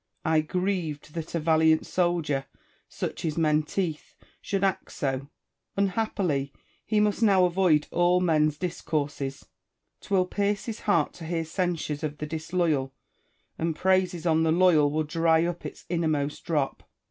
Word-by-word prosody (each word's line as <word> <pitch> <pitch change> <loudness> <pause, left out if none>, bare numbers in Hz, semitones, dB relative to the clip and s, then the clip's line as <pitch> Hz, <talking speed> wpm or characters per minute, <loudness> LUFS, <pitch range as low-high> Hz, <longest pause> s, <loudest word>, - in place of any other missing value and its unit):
I 160 -1 +3
grieved 165 -3 -2
that 165 0 -5
a - - +1
valiant 160 0 +3
soldier 165 -6 0 0.4
(such - - -5
is 160 -2 -2
Menteith) 155 +1 0 0.3
should 195 -1 -2
act 195 -2 0
so. 135 0 -2 0.5
Unhappily! 190 -8 0 0.4
he 215 -1 +2
must 210 +1 +1
now 195 -4 +5
avoid 175 -4 +3
all 175 +1 +3
men's 155 -4 +2
discourses. 145 -5 -3 0.5
'Twill 190 -2 +1
pierce 200 +1 -1
his 225 -2 -5
heart 170 -8 +1
to 165 - -9
hear 165 0 -2
censures 165 -3 -2
of 150 -1 -3
the 150 - -4
disloyal; 155 -4 -1 0.6
and 165 -1 -1
praises 185 -2 +1
on 160 -1 +3
the 160 0 +2
loyal 165 -4 +5
will 155 +2 0
dry 165 +1 +2
up 175 0 -3
its - - -12
innermost 155 -4 -1
drop. 150 -5 -1
165 Hz, 145 wpm, -27 LUFS, 150-180 Hz, 0.6 s, now